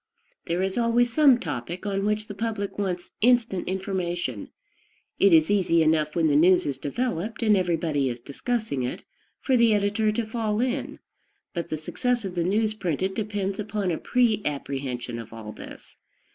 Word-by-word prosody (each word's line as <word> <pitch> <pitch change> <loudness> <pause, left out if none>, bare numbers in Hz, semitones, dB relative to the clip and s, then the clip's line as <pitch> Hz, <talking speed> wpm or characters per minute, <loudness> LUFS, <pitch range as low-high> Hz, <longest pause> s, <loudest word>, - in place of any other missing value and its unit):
There 175 +2 0
is 190 +4 -1
always 235 0 +2
some 280 -5 +6
topic 165 - -5
on 195 -1 -1
which 210 0 0
the 205 - -6
public 205 -1 -3
wants 180 -3 -3
instant 235 -5 +3
information. 175 - -3 0.7
It 200 - +5
is 160 +2 +5
easy 175 -5 +3
enough 155 -1 +1
when 165 -2 +2
the 150 -2 +3
news 180 +4 +5
is 135 -2 -3
developed, 225 - -3
and 215 -2 +5
everybody 165 -7 0
is 120 0 -5
discussing 180 - -3
it, 125 - -4 0.4
for 265 - +2
the 235 -3 +5
editor 205 +1 +1
to 225 +2 -1
fall 220 -1 -2
in; 255 +2 -1 0.6
but 170 -1 -4
the 155 - -2
success 240 +9 -1
of 190 - -4
the 175 -1 0
news 215 +4 +1
printed 190 -2 -2
depends 205 -2 -3
upon 205 -3 -2
a 160 - -2
pre 235 -4 +2
apprehension 135 -4 -4
of 115 -1 -9
all 110 -1 -8
this. - - -12
190 Hz, 175 wpm, -25 LUFS, 160-220 Hz, 0.7 s, some